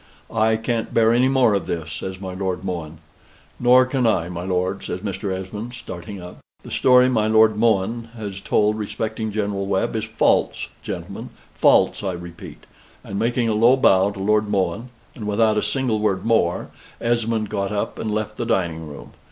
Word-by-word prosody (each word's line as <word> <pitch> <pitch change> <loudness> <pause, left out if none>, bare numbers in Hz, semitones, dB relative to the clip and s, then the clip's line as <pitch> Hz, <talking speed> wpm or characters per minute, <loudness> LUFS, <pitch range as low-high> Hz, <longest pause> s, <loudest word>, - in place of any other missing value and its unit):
"I 110 0 +3
can't 115 0 -3
bear 115 0 +5
any 125 +2 +4
more 130 -5 +3
of 100 - -1
this," 80 -1 -4
says 95 +4 -6
my 95 -1 -6
Lord 95 -1 -3
Mohun. 85 -4 -5 0.6
"Nor 125 +1 +6
can 130 -1 0
I, 85 -6 +1
my 85 -1 -5
lord," 95 +1 -1
says 90 - -4
Mr. 100 0 -3
Esmond, 105 +6 -5
starting 100 -2 -8
up. 90 0 -10 0.2
"The - - -10
story 125 0 +5
my 110 -4 +1
Lord 110 0 +5
Mohun 115 +1 +1
has 100 -3 -6
told 105 +2 +1
respecting 110 +1 -3
General 100 -2 -2
Webb 95 -1 0
is - - -1
false, - - +1
gentlemen - - -6 0.2
false, - - +3
I 95 -2 -1
repeat," 85 -1 -10 0.4
and 100 - -5
making 120 +1 +1
a 110 - +1
low 115 +4 +5
bow 95 -6 +4
to 100 -1 -8
Lord 105 +2 +1
Mohun, 105 +4 -1 0.2
and 105 -3 -7
without 110 +1 +2
a - - -1
single 130 -5 0
word 100 -3 0
more, 110 -7 +1 0.3
Esmond 115 -2 0
got 100 0 -2
up 105 -1 -3
and 110 - -3
left 105 0 -3
the 120 - -2
dining 85 -7 -1
room. 75 - -10
105 Hz, 185 wpm, -22 LUFS, 95-115 Hz, 0.6 s, Nor